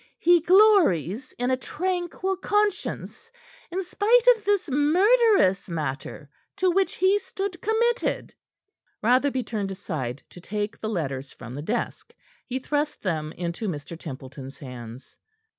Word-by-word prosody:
He 345 0 +5
glories 325 - +4
in 245 +1 0
a 260 - +2
tranquil 365 +5 -2
conscience, 415 +4 -1 0.4
in 370 +3 -2
spite 445 +6 +3
of 440 - -16
this 405 -3 +1
murderous 325 - +4
matter 150 -2 -4 0.3
to 375 -2 +2
which 385 +2 +1
he 380 +2 +3
stood 385 -2 -5
committed." 465 +3 0 0.7
Rotherby 255 +3 +3
turned 210 -4 -3
aside 155 -10 -5
to 175 - -12
take 210 +3 -4
the 220 - -3
letters 140 -9 -3
from 120 0 -10
the 145 - -5
desk. 220 +10 -4 0.3
He 255 - -2
thrust 295 +3 -2
them 155 -5 -2
into 175 +5 -4
Mr. 160 -1 -5
Templeton's 135 -3 -9
hands. 125 -2 -10
255 Hz, 130 wpm, -25 LUFS, -, 0.7 s, He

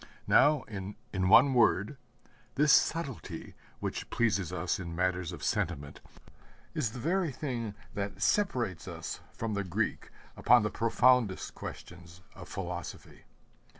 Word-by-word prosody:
Now, 145 0 +5
in 100 -4 -7 0.2
one 100 +9 +6
word, 115 0 +3 0.6
this 150 +1 +5
subtlety 155 -7 0 0.3
which - - -4
pleases 100 -7 +1
us - - -1
in 85 -3 -6
matters 90 -1 0
of - - -9
sentiment 70 +1 -2 0.7
is 130 -9 -1
the 125 - -7
very 170 +4 0
thing 120 -6 -4 0.2
that 100 0 -4
separates 125 - 0
us - - -6
from 115 -1 -4
the 100 0 -1
Greek 90 -3 -2 0.3
upon 120 -1 +5
the 105 - -1
profoundest 115 -2 +2
questions 85 +1 -10
of - - -11
philosophy. - - -7
115 Hz, 125 wpm, -30 LUFS, 95-130 Hz, 0.7 s, one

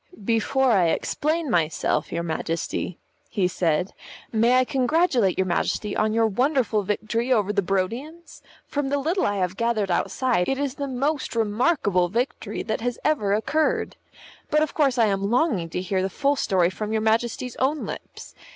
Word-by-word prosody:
"Before 240 +4 +2
I 185 -6 +4
explain 305 - -1
myself, 160 -3 0
your 170 - -2
Majesty," 165 +1 -3 0.3
he 195 -5 +1
said, 175 0 0 0.4
"may 235 +3 +4
I 255 - +4
congratulate 265 - +2
your 190 - +2
Majesty 200 +3 -1
on 215 0 +1
your 225 +1 +2
wonderful 245 0 +1
victory 215 +5 -2
over 210 -4 +2
the 200 - +2
Barodians? 230 - -3 0.2
From 285 -2 -2
the 285 - +1
little 330 +7 0
I 205 - -1
have 185 -1 -1
gathered 230 -5 0
outside, 225 +1 0
it 270 - 0
is 280 -2 -1
the 280 0 -4
most 275 +1 -2
remarkable 210 - +1
victory 230 -1 -2
that 220 - -3
has 245 0 -2
ever 240 -10 +1
occurred. 305 +8 0 0.5
But 305 +1 +3
of 310 - -3
course 275 -5 +2
I 230 - +5
am 200 -1 0
longing 235 - +1
to 180 - -3
hear 185 0 -1
the 190 - -1
full 280 +8 +1
story 185 -8 +2
from 210 +3 -4
your 220 0 0
Majesty's 230 +2 0
own 285 +4 0
lips. - - -8
225 Hz, 170 wpm, -24 LUFS, 195-270 Hz, 0.5 s, I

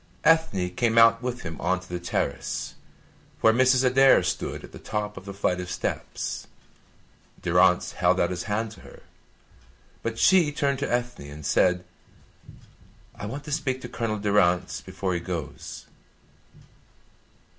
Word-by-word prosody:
Ethne 160 - +3
came 115 +4 0
out 115 0 +6
with 125 0 -4
him 80 -2 -6
on 95 +2 +1
to 95 - -15
the 90 -1 -4
terrace, 85 - -3 0.7
where 110 - +6
Mrs. 130 +1 +4
Adair 135 +1 +5
stood - - -3
at - - -11
the - - -11
top 105 -1 -3
of 95 - -10
the 100 - -6
flight 90 -2 0
of 90 - -7
steps. 90 - -4 1.0
Durrance 90 +1 +3
held - - +2
out - - +2
his 90 -1 -4
hand 110 +1 -2
to - - -14
her, - - -15 1.0
but 115 0 -3
she 170 +3 +5
turned 140 -2 0
to 140 - -2
Ethne 120 -11 -2
and 75 0 -9
said: 90 +3 +2 1.3
"I 105 - -7
want 135 +6 -6
to 150 - -8
speak 140 -4 -1
to 120 - -7
Colonel 115 -3 -2
Durrance 100 -4 +1
before 95 -2 -3
he 85 - -1
goes." 85 -4 -6
105 Hz, 155 wpm, -26 LUFS, 90-125 Hz, 1.3 s, out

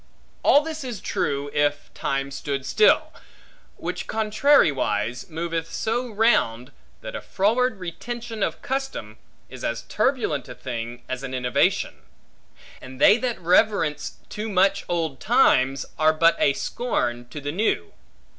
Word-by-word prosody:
All 285 - +6
this 320 -1 -5
is 245 -6 -5
true, 140 -3 -2
if 145 0 0
time 135 0 -2
stood 135 -1 -4
still; 430 - +3 0.6
which - - -5
contrariwise 175 - +2
moveth 165 0 -3
so 240 +3 -1
round, 205 - +2 0.3
that - - -7
a - - -4
froward 225 +4 +1
retention 225 +5 -6
of - - -2
custom, 265 - -4 0.3
is 130 -1 -10
as 115 - -2
turbulent 210 - -1
a 125 - -8
thing 120 -1 -6
as 130 0 -4
an 130 -1 -5
innovation; 125 -1 +1 0.8
and 130 0 -11
they 205 - +7
that 250 -2 -2
reverence 180 -2 +2
too 215 +1 -5
much 195 0 +2
old 160 -6 -1
times, 135 - +3
are 155 0 +5
but 165 +2 +4
a 140 - +4
scorn 120 - -2
to 150 - -7
the 145 0 -4
new. 175 - -1
165 Hz, 135 wpm, -24 LUFS, 135-225 Hz, 0.8 s, they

